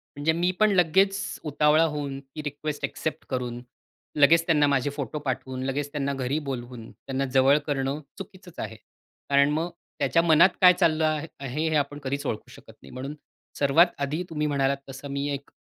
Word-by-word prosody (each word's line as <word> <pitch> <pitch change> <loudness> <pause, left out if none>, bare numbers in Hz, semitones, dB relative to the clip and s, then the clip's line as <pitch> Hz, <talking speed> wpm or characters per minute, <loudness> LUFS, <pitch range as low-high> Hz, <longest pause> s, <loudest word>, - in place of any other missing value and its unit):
म्हणजे 145 +3 +1
मी 175 +2 +1
पण 215 -1 +5
लगेच 190 +2 +3 0.2
उतावळा 150 +1 +3
होऊन 145 -3 -2
ती 135 +2 -10
रिक्वेस्ट 145 0 -5
एक्सेप्ट 155 - -4
करून, 125 -2 -3 0.6
लगेच 160 +3 +5
त्यांना 150 -3 +3
माझे 140 -1 +1
फोटो 145 +1 -5
पाठवून, 130 -2 -4
लगेच 140 +2 -2
त्यांना 140 -2 -2
घरी 135 +1 -1
बोलवून, 120 -3 -6
त्यांना 135 0 -4
जवळ 135 +2 +5
करणं 140 0 -1 0.2
चुकीचंच 185 -2 -11
आहे. 110 - -5 0.5
कारण 140 0 +4
मग 160 +3 -1 0.3
त्याच्या 165 - +3
मनात 165 +2 +6
काय 180 -1 +9
चाललं 160 -2 +2 0.3
आहे 140 +4 -2
हे 160 - 0
आपण 145 0 0
कधीच 140 +1 -3
ओळखू 105 - -4
शकत - - -15
नाही. 65 - -14
म्हणून 135 +3 -6 0.4
सर्वात 145 +5 +5
आधी 150 +5 -1
तुम्ही 150 -2 -1
म्हणालात 140 -1 +1
तसं 135 +1 -8
मी 140 +1 -2
एक 140 0 -7
145 Hz, 175 wpm, -26 LUFS, 135-160 Hz, 0.6 s, काय